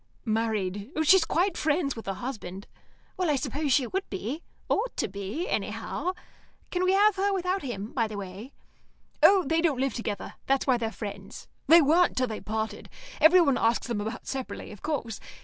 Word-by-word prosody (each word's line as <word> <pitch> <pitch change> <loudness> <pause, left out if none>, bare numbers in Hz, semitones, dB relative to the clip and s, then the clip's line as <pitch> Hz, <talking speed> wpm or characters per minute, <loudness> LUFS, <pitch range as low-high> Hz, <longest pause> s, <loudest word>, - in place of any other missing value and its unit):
"Married. 215 -2 -1
She's 355 +2 +6
quite 350 +3 +1
friends 300 -2 0
with 225 - -9
her 195 - -2
husband." 205 -6 -6 0.5
"Well, 365 -3 0
I 295 - +3
suppose 280 +2 -2
she 260 0 +4
would 385 +9 -3
be. 225 - -4 0.3
Ought - - -1
to - - 0
be, 200 - -4
anyhow. 365 - -2 0.6
Can 360 0 0
we 370 - +3
have 410 +1 +4
her 400 +1 +2
without 375 0 0
him, 220 -6 -5
by 230 -3 +1
the 215 -1 -7
way?" 200 +6 -7 0.7
"Oh, 390 -2 +7
they 325 +4 +2
don't 310 -7 +1
live 270 0 0
together. 215 -4 -4
That's 270 0 +2
why 255 -3 +3
they're 225 -1 -2
friends. 200 -3 -8 0.2
They 330 +2 +8
weren't 335 +5 +3
till 255 - +3
they 220 -3 -5
parted. 220 +1 -4 0.3
Everyone 315 -3 +6
asks 230 +1 +2
them 230 -4 -2
about 220 +2 -5
separately 265 -2 -5
of 210 - -12
course. 235 -8 -3
260 Hz, 185 wpm, -27 LUFS, 220-330 Hz, 0.7 s, They